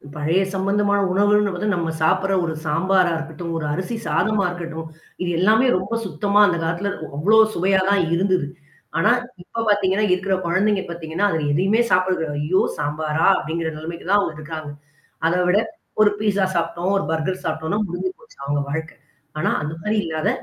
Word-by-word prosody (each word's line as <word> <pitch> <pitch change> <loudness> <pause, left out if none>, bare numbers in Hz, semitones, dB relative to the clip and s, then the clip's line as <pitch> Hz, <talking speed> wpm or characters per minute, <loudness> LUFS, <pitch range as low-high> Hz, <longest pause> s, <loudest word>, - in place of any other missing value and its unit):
பழைய 160 +5 +1
சம்மந்தமான 200 +1 +1
உணவுகள்ன்னு 205 +1 +3
பார்த்த, 195 +4 -3
நம்ம 165 -2 -1
சாப்பிடுற 190 +4 +2
ஒரு 160 - -2
சாம்பாரா 180 +3 +2
இருக்கட்டும், 165 +1 -5
ஒரு 155 - -3
அரிசி 185 +8 -3
சாதமா 215 -2 +1
இருக்கட்டும், 165 -2 -6 0.3
இது 180 - -1
எல்லாமே 220 +7 +4
ரொம்ப 190 +5 -4
சுத்தமா 200 +4 +2
அந்த 175 - 0
காலத்தில 170 +5 -1 0.3
அவ்ளோ 210 +8 +4
சுவையா 190 +2 +2
தான் 200 -3 +3
இருந்தது. 185 -4 +1 0.5
ஆனா 210 - +4 0.3
இப்ப 230 +5 -4
பார்த்தீங்கன்னா 205 0 +2
இருக்குற 190 +1 0
குழந்தைங்க 195 +3 +1
பார்த்தீங்கன்னா, 170 +3 -2
அதில 160 -2 -1
எதையுமே 195 +8 +2
சாப்பிடுறதில்ல, 180 -5 +1
ஐயோ! 185 +5 +2 0.2
சாம்பாரா! 150 +1 -1
அப்டிங்கிற 160 +1 -3
நெலைமைக்கு 165 +2 -7
தான் 205 - +5
அவங்க 180 -5 -1
இருக்காங்க. 155 -1 -6 0.6
அத 170 - +1
விட 200 +3 +4 0.4
ஒரு 210 - +6
பீஸா 200 -2 +1
சாப்ட்டோம், 170 +2 -1
ஒரு 195 - -1
பர்கர் 160 +4 -2
சாப்ட்டோம்னா 160 +5 -1
முடிஞ்சு 175 - -3
போச்சு - - -20
அவங்க 145 0 0
வாழ்க்க 160 0 -5 0.4
ஆனா, - - +1
அந்த 150 +1 -4
மாரி 210 +4 -1
இல்லாத 155 -1 -1
180 Hz, 160 wpm, -21 LUFS, 160-200 Hz, 0.6 s, ஒரு